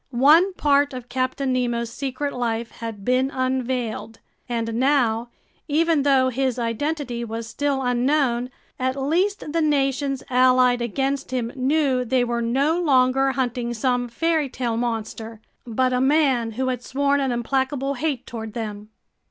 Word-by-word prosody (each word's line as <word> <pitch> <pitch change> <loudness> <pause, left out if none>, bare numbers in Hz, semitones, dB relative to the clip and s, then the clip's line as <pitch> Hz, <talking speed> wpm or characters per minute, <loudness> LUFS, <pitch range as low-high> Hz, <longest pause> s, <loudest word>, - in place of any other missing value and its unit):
One 300 +9 +5
part 285 -3 +2
of 250 0 -8
Captain 260 +1 -1
Nemo's 240 -2 -1
secret 275 +2 -3
life 235 -2 -2
had 225 -4 -7
been 255 +1 +2
unveiled. 255 -4 -2 0.3
And 230 -1 -2
now, 240 -2 +1 0.4
even 320 0 +2
though 270 -2 +3
his 260 0 -1
identity 245 +1 -2
was 230 0 -5
still 275 +3 -1
unknown, 250 0 +1 0.3
at 260 +1 -1
least 330 +3 0
the 330 - +1
nations 275 -2 0
allied 255 -1 +4
against 270 +4 -2
him 245 -2 -2
knew 265 -1 +1
they 250 +1 +1
were 240 -1 -1
no 275 +8 +1
longer 270 -3 +3
hunting 245 -2 -2
some 245 +1 0
fairy 315 +4 0
tale 245 -3 -2
monster, 225 -1 -4 0.3
but 255 +2 +1
a 250 - +1
man 265 -5 +2
who 260 +3 -1
had 250 -2 -2
sworn 280 +2 +1
an 270 -2 0
implacable 265 +3 -1
hate 270 -2 -2
toward 220 -2 -7
them! 210 -2 -6
255 Hz, 145 wpm, -23 LUFS, 235-275 Hz, 0.4 s, One